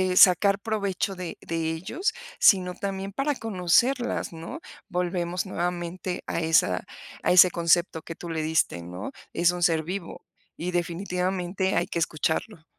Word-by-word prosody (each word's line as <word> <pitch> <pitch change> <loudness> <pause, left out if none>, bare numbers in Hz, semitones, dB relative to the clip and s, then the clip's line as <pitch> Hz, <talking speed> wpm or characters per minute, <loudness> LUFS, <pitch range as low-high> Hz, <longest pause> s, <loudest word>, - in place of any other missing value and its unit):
sacar, 195 +2 +7
eh, - - -13
provecho 200 -3 -1
de 180 -2 -6
de 165 -1 -2
ellos, 335 - -2 0.3
sino 180 -2 +5
también 195 0 -4
para 275 +5 0
conocerlas, 225 +4 +1
¿no? 165 0 -7 0.3
Volvemos 180 0 -1
nuevamente 180 0 -3
a - - -1
esa 160 - +2 0.4
a - - +3
ese 180 0 +8
concepto 170 -1 +2
que 165 - -8
tú 170 - -8
le 160 -1 -2
diste, 155 - +1
¿no? 90 +3 -7 0.2
Es 170 0 +3
un 180 0 -3
ser 165 -2 +3
vivo 180 +1 -6 0.3
y 180 +2 -3
definitivamente 180 +2 -1
hay 175 - +1
que 170 - -2
escucharlo. 160 +3 -1
180 Hz, 150 wpm, -26 LUFS, 165-195 Hz, 0.4 s, ese